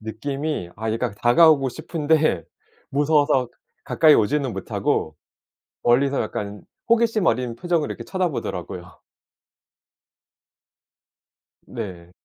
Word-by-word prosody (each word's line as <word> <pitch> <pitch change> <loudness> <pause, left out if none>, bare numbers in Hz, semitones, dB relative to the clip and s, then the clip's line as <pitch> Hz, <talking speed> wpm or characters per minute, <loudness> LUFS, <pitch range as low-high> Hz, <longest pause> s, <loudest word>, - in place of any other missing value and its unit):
느낌이 135 - -4
아 110 +1 -3
얘가 115 0 -2
다가오고 135 +5 +4
싶은데 155 - 0 0.5
무서워서 145 -3 +2 0.4
가까이 155 -2 +5
오지는 140 +5 +1
못하고 - - -2 0.7
멀리서 135 +3 +2
약간 105 -1 -5 0.3
호기심 230 -4 +2
어린 120 0 0
표정으로 170 0 0
이렇게 - - -6
쳐다 185 -2 -1
보더라고요. 145 - -6 2.7
네. 85 -3 -7
140 Hz, 250 characters per minute, -22 LUFS, 110-155 Hz, 2.7 s, 가까이